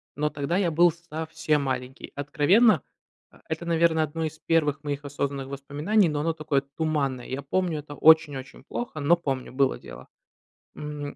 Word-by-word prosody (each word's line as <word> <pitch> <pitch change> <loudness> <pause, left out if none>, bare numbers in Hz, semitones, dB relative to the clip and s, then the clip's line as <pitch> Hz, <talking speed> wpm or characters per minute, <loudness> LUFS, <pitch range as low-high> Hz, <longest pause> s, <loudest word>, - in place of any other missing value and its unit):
но 150 +1 0
тогда 145 +5 -1
я 185 -4 +1
был 170 +2 +5
совсем 160 -2 -2
маленький. 130 -1 -4
Откровенно, 155 - +4 0.5
э, - - -19
это, 160 +2 -4
наверно, 165 -1 +3
одно 155 +1 -2
из 155 0 -6
первых 155 -2 +1
моих 145 0 -4
осознанных 140 -1 -3
воспоминаний, 145 +8 +1
но 150 -1 -1
оно 165 +2 0
такое 155 -3 0
туманное. 140 -3 -2
Я 135 +2 -4
помню 175 +2 0
это 145 0 -9
очень-очень 145 -5 +3
плохо, 240 - -5
но 150 +4 +4
помню 135 -7 -4
было 135 0 +2
дело. 65 +2 -12 0.7
Мгм. 150 -1 -6
150 Hz, 160 wpm, -26 LUFS, 140-165 Hz, 0.7 s, был